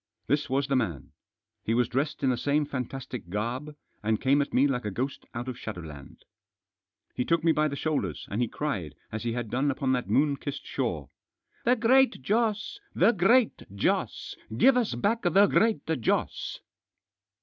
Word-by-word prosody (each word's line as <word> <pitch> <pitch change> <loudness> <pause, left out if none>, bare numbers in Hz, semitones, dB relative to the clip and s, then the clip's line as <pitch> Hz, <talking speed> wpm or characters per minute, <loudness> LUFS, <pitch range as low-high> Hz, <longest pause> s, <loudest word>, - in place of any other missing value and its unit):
This 145 +3 0
was 135 +2 +1
the 135 0 0
man. 85 - -2 0.5
He 115 - 0
was 125 0 +3
dressed 140 +4 -2
in 130 - +4
the - - +1
same 145 +4 +1
fantastic 130 -6 -5
garb, 120 +9 -3 0.3
and 110 +1 0
came 140 +2 +3
at 140 - -3
me 130 - +4
like 130 -3 0
a 105 - -2
ghost 130 +7 -4
out 120 +2 -4
of 130 -1 -5
shadowland. 80 - -9 0.9
He 125 - -1
took 165 +3 +1
me 165 - +5
by 155 -1 +2
the 140 - -4
shoulders, 140 - -2
and 105 +5 -1
he 120 - +2
cried 100 - -3
— - - -38
as 110 - -4
he 120 -1 -2
had 120 -3 -4
done 135 +3 +1
upon 135 -1 0
that 125 -1 -1
moon 140 0 +3
kissed 140 0 -6
shore: - - -3 0.2
— - - -61
" - - -37
The 245 +2 +5
Great 255 +3 +4
Joss! 215 - 0 0.2
The 195 +6 +5
Great 225 +4 +3
Joss! 100 - -1 0.2
Give 270 - +6
us 245 -3 +1
back 225 +3 +1
the 195 +3 +5
Great 215 -5 +2
Joss 160 -8 -1
140 Hz, 190 wpm, -28 LUFS, 120-160 Hz, 0.9 s, Give